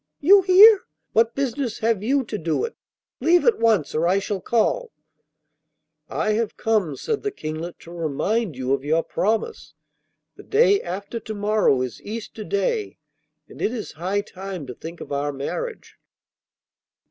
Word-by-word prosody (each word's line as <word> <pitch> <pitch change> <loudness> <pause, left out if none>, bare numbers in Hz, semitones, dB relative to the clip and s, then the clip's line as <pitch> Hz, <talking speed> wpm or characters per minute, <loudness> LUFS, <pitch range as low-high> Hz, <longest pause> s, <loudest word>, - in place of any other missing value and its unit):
'You 390 +6 +7
here! 390 +3 +7 0.3
What 230 +1 +3
business 270 -3 -2
have 225 -3 0
you 265 +5 +1
to 215 -3 -5
do 160 0 -1
it? 465 - -7 0.4
Leave 345 +1 +3
at 475 -3 +3
once, 215 -10 +2
or 160 +2 +1
I 185 +2 +3
shall 195 -1 -3
call 450 - 0 0.6
' - - -54
'I 215 - 0
have 220 0 -1
come,' 210 -10 0
said 445 - -2
the 415 - -1
Kinglet, 160 - -6
'to 170 - -14
remind 175 - -1
you 130 +1 -1
of 135 -1 -1
your 160 +3 +1
promise. 225 - -2 0.6
The - - -10
day 415 -2 +3
after 200 +6 -5
to 220 -1 -7
morrow 205 -10 +2
is 125 -3 -6
Easter 220 0 -7
Day, 425 - -1 0.5
and - - -12
it - - +1
is 235 -4 -5
high 185 +5 -2
time 190 -5 -7
to 125 - -7
think 165 +6 -9
of - - -9
our 145 +1 -1
marriage. 440 - -6
215 Hz, 165 wpm, -23 LUFS, 170-280 Hz, 0.6 s, You